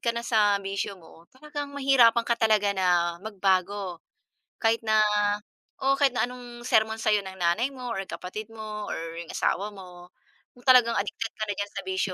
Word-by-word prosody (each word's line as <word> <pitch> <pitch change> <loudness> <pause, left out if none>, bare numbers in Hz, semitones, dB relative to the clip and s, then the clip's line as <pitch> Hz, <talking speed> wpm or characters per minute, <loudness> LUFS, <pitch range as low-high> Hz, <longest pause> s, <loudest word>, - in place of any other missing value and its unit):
ka - - -2
na 235 - -3
sa 210 -3 +3
bisyo 195 0 -3
mo, 165 -1 -17
talagang 290 +1 -6
mahihirapan 250 -4 +4
ka 235 - +1
talaga 215 -3 +3
na 175 -3 +2
magbago. 195 -2 -1 0.6
Kahit 225 0 +1
na 215 -1 +3 0.8
oo, 270 +1 +3
kahit 275 -1 +3
na 245 -1 +1
anong 245 -1 -10
sermon 220 0 +2
sa'yo 210 -2 +2
ng 190 0 -9
nanay 180 +10 +1
mo 250 -3 -6
or 195 - -2
kapatid 205 +5 -7
mo 215 -1 -6
or - - -3 0.2
yung 170 -1 -7
asawa 205 +2 -1
mo, 180 -2 -12 0.4
kung 245 - -20
talagang 250 -2 +7
addicted 210 +2 -3
ka 215 - -2
na 205 - -1
diyan 205 0 -4
sa - - -5
bisyo 380 0 -1
215 Hz, 185 wpm, -26 LUFS, 195-240 Hz, 0.8 s, talagang